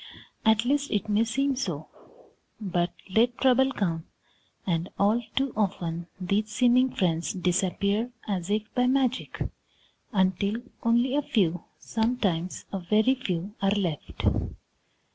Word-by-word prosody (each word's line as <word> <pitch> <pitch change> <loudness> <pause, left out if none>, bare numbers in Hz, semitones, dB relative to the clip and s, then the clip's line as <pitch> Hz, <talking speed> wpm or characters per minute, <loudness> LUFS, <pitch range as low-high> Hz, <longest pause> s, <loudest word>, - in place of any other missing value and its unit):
At 220 +1 +4
least, 285 +2 +1
it 210 +1 -1
may 210 +2 +3
seem 270 +4 0
so. 170 - -3 0.7
But 175 -4 0 0.2
let 235 +5 +2
trouble 265 0 +4
come, 170 -9 -1 0.6
and 170 -1 -1
all 210 +4 +3
too 270 -2 +1
often 175 -5 -1
these 200 +4 0
seeming 250 +3 +4
friends 170 -7 0
disappear 195 +5 0 0.2
as 190 -3 -2
if 210 +1 +1
by 250 0 +2
magic, 260 -1 0 0.7
until 190 0 +1 0.3
only 240 +3 +2
a 295 - +3
few, 180 - 0
sometimes 220 -7 -1
a 195 - -1
very 215 +8 +3
few, 195 -6 -3
are 195 - +3
left. 185 -7 -2
210 Hz, 125 wpm, -27 LUFS, 180-245 Hz, 0.7 s, At